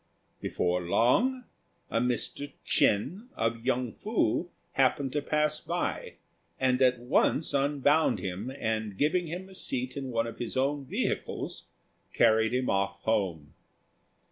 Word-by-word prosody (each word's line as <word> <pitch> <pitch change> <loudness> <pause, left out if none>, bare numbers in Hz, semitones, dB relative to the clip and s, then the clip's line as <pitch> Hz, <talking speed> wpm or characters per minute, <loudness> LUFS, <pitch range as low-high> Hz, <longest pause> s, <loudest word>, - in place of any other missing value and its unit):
Before 90 0 0
long 185 - +2 0.5
a 115 - +2
Mr. 125 +3 -1
Ch'ên, 170 - +2
of 115 0 -1
Yung 125 -2 0
fu, 210 -4 0 0.2
happened 135 0 +2
to 145 - 0
pass 150 +1 +1
by, - - -3 0.4
and 130 0 +2
at 125 -1 +5
once 125 +5 +1
unbound 145 +2 +3
him, 100 +6 -4
and 110 -4 -2
giving 170 +4 +1
him 180 +4 -5
a 190 - -14
seat 130 -8 -2
in 135 -2 -4
one 115 -2 0
of 115 - -7
his 120 +1 -3
own 140 +1 0
vehicles, - - -3 0.5
carried 110 0 +4
him 125 +1 0
off 100 0 0
home. 95 -9 -1
130 Hz, 135 wpm, -29 LUFS, 110-145 Hz, 0.5 s, at